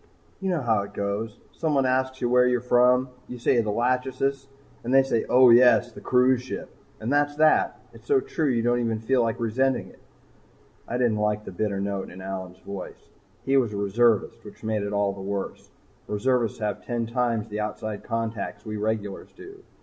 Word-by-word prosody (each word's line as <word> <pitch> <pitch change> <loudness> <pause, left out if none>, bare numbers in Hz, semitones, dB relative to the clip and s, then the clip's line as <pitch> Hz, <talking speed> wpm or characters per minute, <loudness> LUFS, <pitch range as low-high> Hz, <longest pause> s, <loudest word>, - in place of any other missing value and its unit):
You 190 -1 -2
know 175 -4 0
how 110 -4 +2
it 100 0 -9
goes 100 +2 -3
someone 145 -5 0
asks 130 0 0
where 125 +1 +4
you're 125 0 +2
from. 125 +1 +3 0.2
You 125 - -7
say 120 0 +2
the 110 - -3
'Lachesis' 130 +4 -1 0.4
and 120 - -3
they 135 0 +6
say 125 -4 0
'Oh, 125 -1 +7
yes, 120 0 +6
the - - -12
cruise 125 0 +3
ship.' 130 - -7 0.3
And 115 +6 -2
that's 145 0 +2
that. 155 +1 +3
It's - - -16
so 420 -2 +4
true 165 - -1
you 115 -3 +1
don't 120 +1 +2
even 115 -2 0
feel 125 +3 +1
like 115 -1 -1
resenting 130 +4 0
it." - - -19 0.9
I 120 - -2
didn't 120 -4 +1
like 105 0 0
the - - -7
bitter 100 +1 -2
note 100 -1 -3
in 90 - -11
Allyn's 95 -1 -6
voice. 100 -2 -9 0.4
He 135 0 +3
was 120 -5 +1
a - - -3
reservist, 105 +2 +1
which - - -13
made 110 -1 -1
it 100 0 -3
all 100 -1 +1
the 100 - -9
worse. 100 0 -5 0.4
Reservists 115 +1 0
have 105 -1 -3
ten 120 -2 -2
times 115 -2 -1
the 105 0 -4
outside 105 0 -4
contacts 115 -3 -4
we 110 -1 -4
regulars 105 -2 -3
do. 395 +1 -12
115 Hz, 195 wpm, -25 LUFS, 105-130 Hz, 0.9 s, Oh